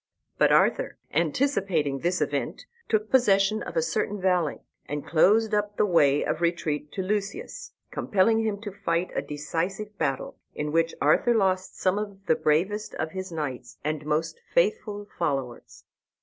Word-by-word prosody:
But - - +5
Arthur, - - +3 0.2
anticipating 165 - +1
this 175 +4 0
event, - - -2 0.2
took 215 -1 0
possession 215 -4 +4
of - - -5
a - - +3
certain 205 - -1
valley, 180 -5 +1 0.2
and 145 0 -4
closed 215 +7 +4
up 210 0 0
the - - +4
way 145 -7 +3
of 160 - -2
retreat 155 -3 -1
to 190 - -2
Lucius, 210 - -3 0.2
compelling 220 +3 +2
him 210 -2 -1
to 210 -2 -5
fight 185 -3 -1
a - - 0
decisive 170 +8 -4
battle, 135 -4 -2 0.2
in 150 0 -2
which 165 +1 +1
Arthur 195 - +3
lost 190 -3 +1
some 190 +2 +2
of 200 -2 -7
the 165 - +4
bravest 190 +9 0
of 160 - -3
his 190 0 -6
knights 150 -6 -5
and 155 0 -2
most 155 - -1
faithful 325 - +1
followers. 135 -7 -3
185 Hz, 155 wpm, -26 LUFS, 155-210 Hz, 0.2 s, But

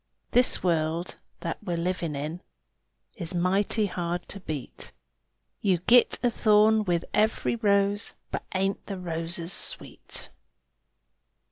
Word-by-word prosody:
This 245 +1 +4
world 165 0 0 0.2
that 165 - -4
we're 175 - -2
a - - -3
livin' 170 -3 -2
in 155 +5 -4 0.8
Is 170 +1 -3
mighty 195 +5 +1
hard 175 -2 -3
to 200 - -6
beat; 155 -8 -6 0.7
You 190 -3 +3
git 245 0 +6
a 245 - +3
thorn 215 0 +4
with 175 -2 0
every 215 +2 +1
rose, 205 -1 +1 0.2
But - - -3
_ain't 195 +1 0
_the 195 - -4
roses 170 0 -2
sweet! - - -1
180 Hz, 125 wpm, -27 LUFS, 170-205 Hz, 0.8 s, git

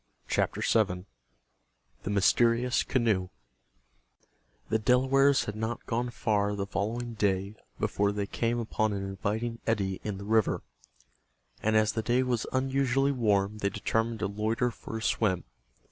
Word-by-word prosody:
CHAPTER - - 0
VII—THE 60 - -4
MYSTERIOUS 115 +5 +3
CANOE 110 -7 +1 1.4
The 110 - +2
Delawares 135 +4 +4
had 105 - -4
not 110 +2 -3
gone 120 +1 -1
far 105 -4 0
the 100 -1 -2
following 115 +5 -3
day 100 -2 0 0.3
before 100 0 +1
they 100 0 -2
came 115 +3 -1
upon 110 -2 0
an 100 -1 -3
inviting 105 +4 -3
eddy 100 -4 0
in 105 -2 -3
the 100 - -7
river, 110 0 +2 1.0
and 110 0 +1
as 110 0 +4
the 110 - -2
day 125 +3 +2
was 120 -3 -1
unusually 135 +1 +1
warm 105 -4 +1
they 100 - +1
determined 110 +2 -1
to - - +1
loiter 110 +4 0
for 115 - -7
a 110 - -6
swim. 95 -8 +1
110 Hz, 140 wpm, -29 LUFS, 100-120 Hz, 1.4 s, Delawares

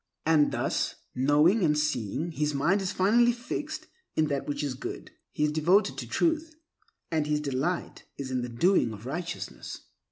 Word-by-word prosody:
And 155 -2 +4
thus, - - -1 0.2
knowing 150 - +4
and 150 -2 +3
seeing, 150 - -1
his 150 -2 -1
mind 175 +8 +2
is 190 0 -1
finally 230 +6 +4
fixed 245 +6 -5 0.3
in 155 -1 +2
that 140 -1 -2
which 145 0 -2
is 140 -3 -1
good. - - -7 0.2
He 150 - -1
is 150 - +2
devoted 170 +7 +3
to - - -5
Truth, 325 -1 0 0.6
and 155 -2 +1
his 150 0 +1
delight 150 +5 -2
is 135 -2 -5
in 130 -1 0
the 120 - -4
doing 120 - +2
of 105 +2 -10
righteousness. 170 +6 -5
150 Hz, 170 wpm, -28 LUFS, 140-190 Hz, 0.6 s, And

